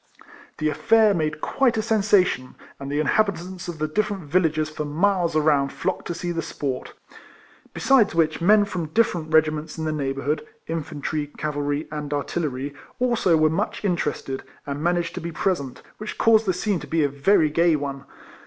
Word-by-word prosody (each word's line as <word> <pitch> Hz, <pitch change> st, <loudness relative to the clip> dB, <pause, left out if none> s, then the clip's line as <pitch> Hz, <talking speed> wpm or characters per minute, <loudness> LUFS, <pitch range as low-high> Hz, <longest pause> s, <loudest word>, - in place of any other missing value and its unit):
The 155 Hz, -, 0 dB
affair 220 Hz, +6 st, +4 dB
made 155 Hz, -3 st, -2 dB
quite 260 Hz, -5 st, +1 dB
a 215 Hz, -, 0 dB
sensation, 200 Hz, -, +2 dB, 0.2 s
and 140 Hz, 0 st, -6 dB
the 145 Hz, -, 0 dB
inhabitants 180 Hz, +2 st, 0 dB
of 170 Hz, -2 st, -5 dB
the 155 Hz, 0 st, -1 dB
different 205 Hz, +2 st, -1 dB
villages 155 Hz, -1 st, +1 dB
for 155 Hz, 0 st, -5 dB
miles 170 Hz, +2 st, +1 dB
around 145 Hz, -3 st, +3 dB
flocked 190 Hz, -, -3 dB
to 175 Hz, -, -3 dB
see 175 Hz, +1 st, -3 dB
the 165 Hz, -1 st, -2 dB
sport; 135 Hz, -5 st, -4 dB, 0.8 s
besides 250 Hz, -9 st, +3 dB
which 160 Hz, -1 st, +2 dB
the 170 Hz, -, -3 dB
men 210 Hz, +1 st, +6 dB
from 180 Hz, -5 st, -4 dB
different 165 Hz, -3 st, 0 dB
regiments 155 Hz, 0 st, +2 dB
in 160 Hz, -, -3 dB
the 155 Hz, -, 0 dB
neighbourhood, 140 Hz, 0 st, -2 dB, 0.2 s
infantry, 155 Hz, -1 st, -3 dB
cavalry, 145 Hz, 0 st, -3 dB
and 150 Hz, -1 st, -3 dB
artillery, 145 Hz, -2 st, -3 dB, 0.3 s
also 235 Hz, -9 st, +3 dB
were 155 Hz, 0 st, +3 dB
much 205 Hz, +4 st, -2 dB
interested, 150 Hz, -7 st, -1 dB, 0.2 s
and 140 Hz, 0 st, -4 dB
managed 175 Hz, 0 st, 0 dB
to -, -, -5 dB
be 170 Hz, +1 st, -5 dB
present, 150 Hz, -6 st, -2 dB, 0.2 s
which 215 Hz, 0 st, -6 dB
caused 225 Hz, -1 st, +4 dB
the 185 Hz, -, +3 dB
scene 195 Hz, 0 st, 0 dB
to -, -, -9 dB
be 160 Hz, -1 st, +1 dB
a -, -, +3 dB
very 150 Hz, +3 st, +2 dB
gay 170 Hz, +1 st, +3 dB
one. 140 Hz, -2 st, -4 dB
160 Hz, 175 wpm, -24 LUFS, 150-185 Hz, 0.8 s, men